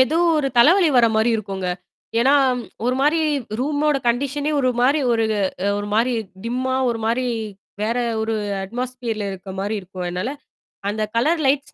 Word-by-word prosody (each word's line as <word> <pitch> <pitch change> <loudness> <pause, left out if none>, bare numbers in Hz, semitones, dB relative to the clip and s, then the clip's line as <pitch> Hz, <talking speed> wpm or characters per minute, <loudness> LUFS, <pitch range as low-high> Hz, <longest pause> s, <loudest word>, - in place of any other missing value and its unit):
ஏதோ 260 +6 +3 0.2
ஒரு 280 -3 +1
தலைவலி 335 +8 +6
வர 235 -1 +6
மாரி 220 +2 +3
இருக்குங்க. 195 -3 -4 0.5
ஏன்னா, 265 +3 +4 0.5
ஒரு 250 - +2
மாரி 300 +4 +3 0.4
ரூமோட 295 +2 +1
கண்டிஷனே 280 +5 0
ஒரு 255 -1 +2
மாரி 275 +5 +3
ஒரு 225 -1 +2 0.5
ஒரு 205 - -4
மாரி 235 +3 +2 0.3
டிம்மா 255 +2 -1
ஒரு 230 -1 -1
மாரி, 250 +2 +1 0.6
வேற 225 +3 0 0.3
ஒரு 220 0 -1 0.3
அட்மாஸ்பியர்ல 235 -1 -4
இருக்க 190 0 -8
மாரி 205 +2 -2
இருக்கும். 185 -1 -7
அதனால, 180 +7 -2 0.6
அந்த 215 +1 -2
கலர் 310 +8 +2
லைட்ஸ் 275 +1 0
245 Hz, 150 wpm, -21 LUFS, 220-275 Hz, 0.6 s, தலைவலி